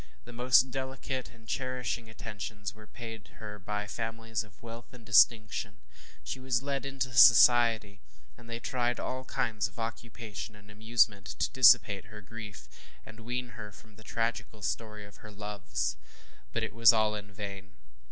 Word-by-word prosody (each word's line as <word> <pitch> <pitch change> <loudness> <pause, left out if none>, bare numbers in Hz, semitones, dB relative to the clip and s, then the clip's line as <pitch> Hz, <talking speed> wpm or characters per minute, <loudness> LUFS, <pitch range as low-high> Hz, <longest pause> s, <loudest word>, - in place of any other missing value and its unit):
The 120 - -11
most 125 +2 +4
delicate 130 0 -4
and 115 -1 -19
cherishing 125 -3 -3
attentions 105 -2 -6
were 110 0 -15
paid 115 -2 -9
her 105 -1 -8
by 105 +1 -3
families 115 0 -4
of 100 -3 -20
wealth 115 0 -9
and 115 -2 -14
distinction. 110 0 +4 0.5
She 130 - -5
was 130 -1 0
led 140 -1 -2
into 135 -2 -3
society, 115 -3 +6 0.4
and 115 -1 -16
they 115 0 -4
tried 120 0 -1
by - - -4
all 130 0 -4
kinds 110 -3 -1
of 100 - -20
occupation 115 -2 -6
and 105 0 -16
amusement 110 -2 +2
to - - 0
dissipate 115 -5 +6
her 105 0 -11
grief, 105 0 -9 0.4
and 110 +1 -12
wean 125 +2 -4
her 110 -2 -9
from 110 +1 -17
the 110 - -15
tragical 115 -2 -3
story 105 +3 -3
of 100 - -15
her 110 - -12
loves. 95 - -3 0.5
But - - -2
it - - -3
was 115 0 +7
all 110 -2 +2
in 105 -1 -7
vain. 100 -2 -8
110 Hz, 165 wpm, -30 LUFS, 105-120 Hz, 0.5 s, was